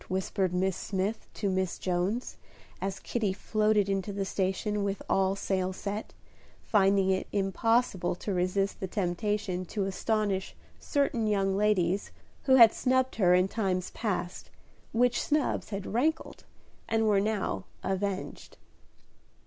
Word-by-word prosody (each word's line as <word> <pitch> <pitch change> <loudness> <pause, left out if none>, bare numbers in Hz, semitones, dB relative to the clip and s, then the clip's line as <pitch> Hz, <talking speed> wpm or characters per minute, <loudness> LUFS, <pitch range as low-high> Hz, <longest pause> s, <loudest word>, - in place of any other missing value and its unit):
whispered 190 0 -1
Miss 185 +1 0
Smith 200 +4 -3
to 205 - -2
Miss 185 -2 -1
Jones, 185 +6 -1 0.5
as 195 0 -2
Kitty 215 -5 -1
floated 210 0 +1
into 195 +1 -1
the 200 0 -2
station 195 +2 -1
with 200 0 -2
all 195 0 +2
sail 190 -1 -1
set, 205 +3 -5 0.5
finding 195 -2 +3
it 190 - -1
impossible 195 -1 +1
to 200 +3 -4
resist 185 +2 0
the 190 - -3
temptation 185 0 -1
to 200 +2 -2
astonish 195 0 -1 0.2
certain 260 -6 0
young 195 -2 +1
ladies 200 -2 +1 0.4
who 260 - +6
had 230 -4 +9
snubbed 260 0 +1
her 180 -4 +5
in 180 +1 +3
times 190 -4 -1
past, 185 -5 -3 0.4
which 245 +1 +2
snubs 300 -2 0
had 200 -2 -4
rankled, 310 +7 -1 0.4
and 225 0 +2
were 205 -2 +4
now 205 - -1 0.2
avenged. 195 0 -3
195 Hz, 135 wpm, -29 LUFS, 190-215 Hz, 0.5 s, had